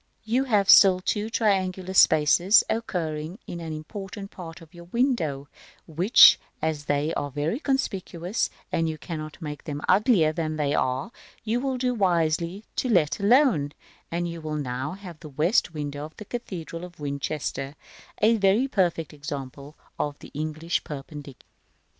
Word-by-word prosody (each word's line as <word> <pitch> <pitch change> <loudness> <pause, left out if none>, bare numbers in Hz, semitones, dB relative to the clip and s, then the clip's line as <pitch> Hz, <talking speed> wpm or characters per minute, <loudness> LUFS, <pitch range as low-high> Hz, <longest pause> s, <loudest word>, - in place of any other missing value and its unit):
You 245 +5 +1
have 210 -6 +2
still 190 -2 +8
two 210 +3 -2
triangular 190 -4 0
spaces 170 +4 +5
occurring 165 -6 -3
in 175 - -6
an 165 -1 -6
important 195 +5 -7
part 165 -3 -9
of 165 -2 -16
your 170 0 -12
window, 175 - 0
g - - -20 0.4
g, 160 - -15
which, 180 +9 +7 0.2
as 155 -2 -2
they 145 +3 0
are 145 - -2
very 150 - -2
conspicuous, 195 - -2 0.2
and 165 -1 0
you 155 - -4
cannot 155 -2 -7
make 150 -3 -7
them 145 -1 -4
uglier 190 - +4
than 155 -1 -2
they 145 -2 0
are, 130 - -1 0.3
you 230 +2 0
will 265 0 -2
do 250 0 0
wisely 175 -1 0
to 255 - 0
let 175 -7 +2
alone; 200 - +3 0.4
and 175 +1 -2
you 170 -1 -6
will 155 -1 -4
now 130 +2 -3
have 185 -5 -10
the 155 - -10
west 160 - +1
window 145 -1 -4
of 155 - -13
the 210 - -9
cathedral 175 -8 -6
of 175 -2 -11
Winchester, 140 -1 -4 0.5
a 225 +2 +5
very 205 +6 +3
perfect 175 - 0
example 140 0 -7 0.2
of 145 -1 -2 0.2
English 155 +3 -2
Perpendicular. 145 -1 -9
165 Hz, 160 wpm, -25 LUFS, 150-200 Hz, 0.5 s, still